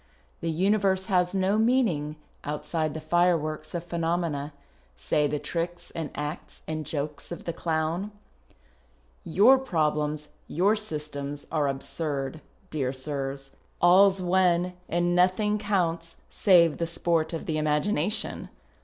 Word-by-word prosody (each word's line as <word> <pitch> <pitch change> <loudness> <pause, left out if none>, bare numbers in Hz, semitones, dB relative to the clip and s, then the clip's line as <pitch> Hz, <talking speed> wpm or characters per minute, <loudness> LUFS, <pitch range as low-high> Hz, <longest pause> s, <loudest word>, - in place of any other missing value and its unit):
" - - -37
The - - -1
universe 190 +2 +2
has 180 +1 +2
no 195 +2 +2
meaning 220 - +2 0.3
outside 155 +1 -2
the - - -3
fireworks 155 -1 +1
of 170 - -2
phenomena 165 -4 -1 0.2
— 65 +1 -34
say 150 -1 +3
the 150 +1 -1
tricks 170 +4 -4
and 160 -2 -4
acts 150 +2 -6
and 155 -1 -4
jokes 145 0 -4
of 170 - -6
the 170 - -3
clown. 165 +4 -1 1.1
Your 225 +11 +5
i)roblcms, 150 - -1 0.2
your 195 +6 +2
systems, 150 -7 -5
are 150 -3 +1
absurd, 140 +1 -3 0.3
dear 135 -5 -1
sirs; 135 0 -4 0.3
all's 190 +2 +5
one 180 0 +2 0.2
and 175 +1 +1
nothing 195 +4 +3
counts 170 -5 -1 0.2
save 170 -6 +5
the 170 - 0
sport 165 -1 0
of 165 - -4
the 155 -2 -1
imagination. 155 +6 0
165 Hz, 130 wpm, -27 LUFS, 150-180 Hz, 1.1 s, Your